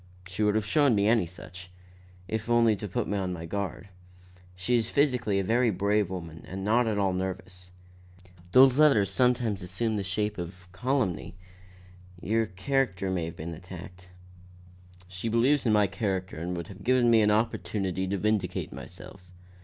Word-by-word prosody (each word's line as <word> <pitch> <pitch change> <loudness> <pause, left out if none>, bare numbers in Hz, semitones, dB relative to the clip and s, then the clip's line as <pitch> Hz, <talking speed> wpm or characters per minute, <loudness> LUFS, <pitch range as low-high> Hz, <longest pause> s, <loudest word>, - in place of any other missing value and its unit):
"She 90 +3 -5
would 105 0 +3
have 110 -2 +1
shown 140 +2 +3
me 100 0 +2
any 110 -5 +3
such, 90 +1 -11 0.6
if 110 +3 -3
only 115 -2 +4
to 105 +1 -6
put 95 - -2
me 100 0 -1
on 95 -1 -2
my 85 -2 -5
guard. 100 +2 -4 0.7
She 90 +7 0
is 115 -1 +1
physically 125 -8 +1
a 100 - +1
very 115 +5 +2
brave 100 0 +1
woman 85 -3 -7
and 95 +1 -5
not 115 +3 +3
at 110 -2 0
all 100 -2 +1
nervous." 90 -1 -5 0.8
"Those 130 +1 +6
letters 125 -11 +5
sometimes 125 -5 +1
assume 110 +5 -2
the 100 - -2
shape 105 +2 -2
of 90 +1 -8
calumny. 110 - -1 0.8
Your 110 +4 0
character 95 -1 -1
may 90 -3 -1
have 80 - -7
been 85 +2 -6
attacked." 90 +1 -11 1.0
"She 95 +5 -4
believes 125 +4 +2
in - - +4
my 105 -1 +5
character 95 -2 -3
and 90 +2 -3
would 85 -1 -5
have 100 0 -11
given 125 0 +3
me 115 -1 +6
an 105 - +3
opportunity 100 -4 -1
to 100 +1 -1
vindicate 100 -3 -1
myself. 90 -2 -11
100 Hz, 170 wpm, -28 LUFS, 90-115 Hz, 1.0 s, Those